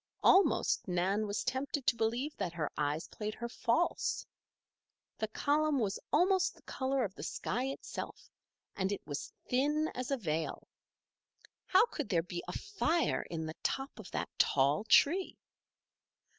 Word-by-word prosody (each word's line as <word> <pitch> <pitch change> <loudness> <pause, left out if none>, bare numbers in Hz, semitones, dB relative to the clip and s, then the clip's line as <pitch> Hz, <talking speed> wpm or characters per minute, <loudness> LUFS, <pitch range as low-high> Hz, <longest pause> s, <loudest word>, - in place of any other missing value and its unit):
Almost 385 - +4
Nan 190 +4 +1
was 205 +1 -2
tempted 260 +2 -2
to 245 - +4
believe 235 +7 -1
that 180 -4 -2
her 155 -4 -2
eyes 150 +2 -1
played 215 0 -5
her 235 - -4
false. 240 +6 0 0.9
The 220 - 0
column 295 +6 +1
was 205 -6 0
almost 370 +3 +3
the - - -21
color 265 0 -1
of 195 -4 -3
the - - -10
sky 250 +3 -2
itself, 270 +1 -6 0.4
and 190 0 0
it 200 - -4
was 145 -1 -5 0.2
thin 295 +5 +1
as 250 0 -4
a 275 - +1
veil. 160 -7 -2 1.0
How 380 +5 +6
could 295 - -5
there 170 -5 +2
be 175 0 -5
a - - -3
fire 345 -5 +1
in 160 -1 -3
the 155 - -4
top 270 -3 -2
of 210 - -9
that - - -3
tall 140 +8 +3
tree? 350 - +4
235 Hz, 155 wpm, -33 LUFS, 180-285 Hz, 1.0 s, How